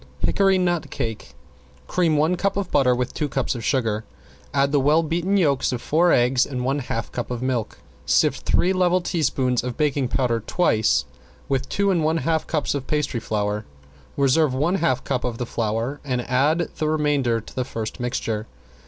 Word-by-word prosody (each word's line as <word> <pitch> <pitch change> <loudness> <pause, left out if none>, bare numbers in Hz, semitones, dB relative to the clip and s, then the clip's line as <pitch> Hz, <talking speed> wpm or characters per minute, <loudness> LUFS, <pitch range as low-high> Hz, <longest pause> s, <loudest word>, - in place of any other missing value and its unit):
~HICKORY 195 -1 +3
NUT 175 -5 0
CAKE~ 110 -3 -5 0.5
Cream 165 - +1
one 160 +4 +2
cup 195 +2 -1
of 200 -3 -2
butter 130 -3 +3
with 125 0 -2
two 150 -2 -2
cups 135 -2 -1
of 120 -3 -6
sugar, 110 -4 0 0.5
add 140 0 +2
the 145 - +3
well 150 +4 +3
beaten 175 +5 0
yolks 140 -8 +2
of 125 - -2
four 170 +7 +2
eggs, 125 +1 +3
and 125 -3 -4
one 135 +2 0
half 115 -4 -4
cup 120 - -4
of 125 0 -4
milk. 125 -4 -2 0.3
Sift - - +3
three 185 +2 +2
level 185 0 +2
teaspoons 130 -8 0
of 125 -1 -4
baking 145 -3 +1
powder 120 -2 0
twice 110 - +1 0.4
with 130 -1 -1
two 200 0 +1
and 170 -4 +1
one 160 +1 +2
half 160 0 0
cups 155 -3 -1
of 140 -2 -4
pastry 150 -6 -1
flour. 105 -1 -2 0.5
Reserve 140 0 +3
one 165 +8 +1
half 130 -8 0
cup 130 -3 -2
of 120 -2 -3
the 125 - -3
flour 115 +5 -2
and 125 -4 -2
add 150 +7 +2
the 155 - 0
remainder 145 -6 +1
to 110 - -13
the 130 - 0
first 115 -1 -5
mixture. 115 -3 -2
135 Hz, 190 wpm, -23 LUFS, 125-160 Hz, 0.5 s, ~HICKORY